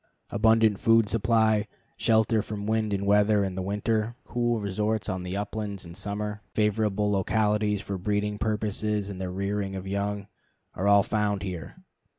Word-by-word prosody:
Abundant 110 Hz, -1 st, +4 dB
food 115 Hz, -1 st, +4 dB
supply, 110 Hz, -1 st, +2 dB, 0.3 s
shelter 110 Hz, 0 st, +3 dB
from 105 Hz, -1 st, -5 dB
wind 110 Hz, 0 st, 0 dB
and 100 Hz, 0 st, -1 dB
weather 105 Hz, 0 st, +4 dB
in 95 Hz, -1 st, -2 dB
winter, 105 Hz, +3 st, -1 dB
cool 120 Hz, -1 st, 0 dB
resorts 105 Hz, 0 st, -1 dB
on 95 Hz, -1 st, -2 dB
the 90 Hz, +2 st, -4 dB
uplands 100 Hz, -1 st, -4 dB
in 85 Hz, -, -9 dB
summer, 105 Hz, +2 st, -4 dB
favorable 105 Hz, -1 st, +1 dB
localities 105 Hz, +1 st, +1 dB
for 100 Hz, -1 st, -4 dB
breeding 105 Hz, +2 st, -1 dB
purposes 105 Hz, -1 st, -1 dB
and 95 Hz, -1 st, -7 dB
the 95 Hz, -, -3 dB
rearing 100 Hz, +1 st, -2 dB
of 95 Hz, 0 st, -5 dB
young, 100 Hz, +1 st, -2 dB, 0.5 s
all 95 Hz, -, -1 dB
are 100 Hz, -1 st, +6 dB
found 105 Hz, -2 st, 0 dB
here. 90 Hz, -4 st, -6 dB
105 Hz, 155 wpm, -27 LUFS, 100-110 Hz, 0.5 s, are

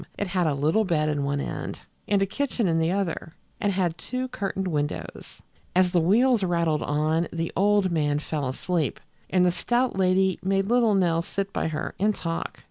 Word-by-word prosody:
It 205 Hz, -, -1 dB
had 180 Hz, -2 st, +1 dB
a 145 Hz, -, +1 dB
little 155 Hz, +10 st, +2 dB
bed 155 Hz, -6 st, +1 dB
in 145 Hz, -2 st, -1 dB
one 140 Hz, 0 st, -1 dB
end, -, -, -5 dB, 0.3 s
and 200 Hz, -1 st, +3 dB
a -, -, +2 dB
kitchen 240 Hz, +1 st, -1 dB
in 165 Hz, -1 st, +2 dB
the 160 Hz, 0 st, +1 dB
other, 175 Hz, -4 st, -2 dB, 0.3 s
and 205 Hz, -, +1 dB
had 175 Hz, -4 st, -1 dB
two 255 Hz, +5 st, -4 dB
curtained 195 Hz, -4 st, -3 dB
windows. 150 Hz, -4 st, -4 dB, 0.3 s
As 185 Hz, -1 st, +4 dB
the 175 Hz, -2 st, +3 dB
wheels 230 Hz, +7 st, +4 dB
rattled 170 Hz, -4 st, +1 dB
on 155 Hz, +3 st, 0 dB
the 165 Hz, 0 st, -3 dB
old 200 Hz, -1 st, +3 dB
man 145 Hz, -3 st, +1 dB
fell 150 Hz, -2 st, -3 dB
asleep, 155 Hz, +3 st, -1 dB, 0.3 s
and 180 Hz, -1 st, +3 dB
the 180 Hz, -, +4 dB
stout 240 Hz, +6 st, 0 dB
lady 190 Hz, 0 st, +2 dB
made 195 Hz, +1 st, +1 dB
little 235 Hz, -3 st, +4 dB
Nell 170 Hz, -3 st, +2 dB
sit 195 Hz, +3 st, -4 dB
by -, -, -1 dB
her 155 Hz, -1 st, -3 dB
and 210 Hz, +1 st, +2 dB
talk. 165 Hz, -1 st, -4 dB
180 Hz, 195 wpm, -25 LUFS, 160-200 Hz, 0.3 s, As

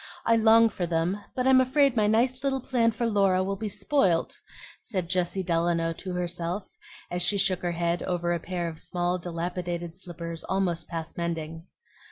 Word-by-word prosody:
I 230 Hz, -, +5 dB
long 225 Hz, 0 st, +6 dB
for 180 Hz, -5 st, -3 dB
them, 170 Hz, +4 st, 0 dB
but 255 Hz, -, 0 dB
I'm 260 Hz, 0 st, +6 dB
afraid 270 Hz, 0 st, +3 dB
my 215 Hz, -2 st, +3 dB
nice 245 Hz, +5 st, +2 dB
little 270 Hz, -1 st, +1 dB
plan 245 Hz, -3 st, +2 dB
for 230 Hz, +2 st, -2 dB
Laura 195 Hz, -4 st, +3 dB
will 195 Hz, +1 st, -2 dB
be 215 Hz, +2 st, -4 dB
spoilt," 195 Hz, -, +1 dB, 0.4 s
said 185 Hz, -6 st, -3 dB
Jessie 185 Hz, +1 st, 0 dB
Delano 165 Hz, -1 st, +1 dB
to 185 Hz, +2 st, -6 dB
herself, 180 Hz, +2 st, -3 dB, 0.4 s
as 175 Hz, 0 st, -1 dB
she 200 Hz, +3 st, +2 dB
shook 190 Hz, -2 st, +1 dB
her 175 Hz, -1 st, -1 dB
head 170 Hz, +1 st, 0 dB
over 175 Hz, -1 st, -1 dB
a 170 Hz, -, -1 dB
pair 175 Hz, 0 st, -3 dB
of 160 Hz, -1 st, -7 dB
small, 175 Hz, 0 st, -1 dB
dilapidated 175 Hz, 0 st, -4 dB
slippers 170 Hz, -3 st, -7 dB
almost 180 Hz, -4 st, -1 dB
past 165 Hz, -1 st, -6 dB
mending. 165 Hz, 0 st, -4 dB
180 Hz, 180 wpm, -27 LUFS, 170-210 Hz, 0.4 s, long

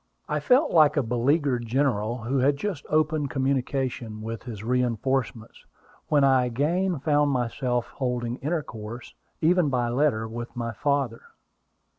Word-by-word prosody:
I 150 Hz, -, -1 dB
felt 255 Hz, -, +3 dB
like 155 Hz, -2 st, +5 dB
a 145 Hz, -, +3 dB
beleaguered 125 Hz, +1 st, +1 dB
general 120 Hz, -3 st, 0 dB
who 130 Hz, +4 st, 0 dB
had 140 Hz, +2 st, +3 dB
just 175 Hz, -3 st, -4 dB
opened 155 Hz, -2 st, +1 dB
communication 130 Hz, -4 st, -2 dB
with 115 Hz, 0 st, -5 dB
his 110 Hz, -5 st, -8 dB
reinforcements, 125 Hz, -1 st, -1 dB, 0.4 s
when 145 Hz, -2 st, +3 dB
I 130 Hz, -2 st, +4 dB
again 165 Hz, +9 st, 0 dB
found 145 Hz, -1 st, +2 dB
myself 125 Hz, -1 st, -1 dB
holding 125 Hz, -2 st, -3 dB
intercourse, 120 Hz, -7 st, -5 dB, 0.3 s
even 170 Hz, -1 st, +3 dB
by 125 Hz, -2 st, 0 dB
letter, 120 Hz, -3 st, +1 dB
with 120 Hz, +2 st, -7 dB
my 115 Hz, -1 st, -3 dB
father. 140 Hz, -2 st, -1 dB
130 Hz, 135 wpm, -26 LUFS, 120-145 Hz, 0.4 s, like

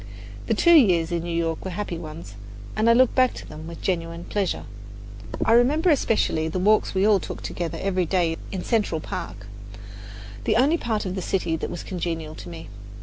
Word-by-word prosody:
The -, -, +2 dB
two 340 Hz, -, +5 dB
years 180 Hz, -, +5 dB
in 170 Hz, -1 st, 0 dB
New 170 Hz, -, -5 dB
York 165 Hz, -1 st, -1 dB
were 190 Hz, -, -4 dB
happy 180 Hz, -2 st, -4 dB
ones, 155 Hz, -9 st, -9 dB, 0.4 s
and 220 Hz, +2 st, +3 dB
I -, -, +7 dB
look 255 Hz, +1 st, +4 dB
back 255 Hz, -1 st, +3 dB
to -, -, -8 dB
them 155 Hz, +1 st, -9 dB
with 170 Hz, 0 st, -9 dB
genuine 170 Hz, -2 st, -2 dB
pleasure. 200 Hz, -1 st, -2 dB, 0.8 s
I -, -, +3 dB
remember 285 Hz, +9 st, +4 dB
especially 220 Hz, -, +1 dB
the 160 Hz, -, -3 dB
walks 210 Hz, +2 st, +2 dB
we 190 Hz, +1 st, +3 dB
all 210 Hz, -2 st, +5 dB
took -, -, -7 dB
together 165 Hz, -2 st, -4 dB
every 185 Hz, -3 st, 0 dB
day 170 Hz, -2 st, +1 dB, 0.2 s
in 190 Hz, -2 st, -4 dB
Central 210 Hz, -8 st, 0 dB
Park, 100 Hz, -, -6 dB, 1.0 s
the 215 Hz, -, +2 dB
only 285 Hz, +8 st, +3 dB
part 220 Hz, -3 st, -2 dB
of 185 Hz, -, -3 dB
the 190 Hz, -, -3 dB
city 175 Hz, -3 st, -1 dB
that 160 Hz, -, -4 dB
was 175 Hz, -, -6 dB
congenial 165 Hz, -4 st, -4 dB
to 95 Hz, -, -9 dB
me. 85 Hz, 0 st, -9 dB
180 Hz, 200 wpm, -24 LUFS, 165-215 Hz, 1.0 s, I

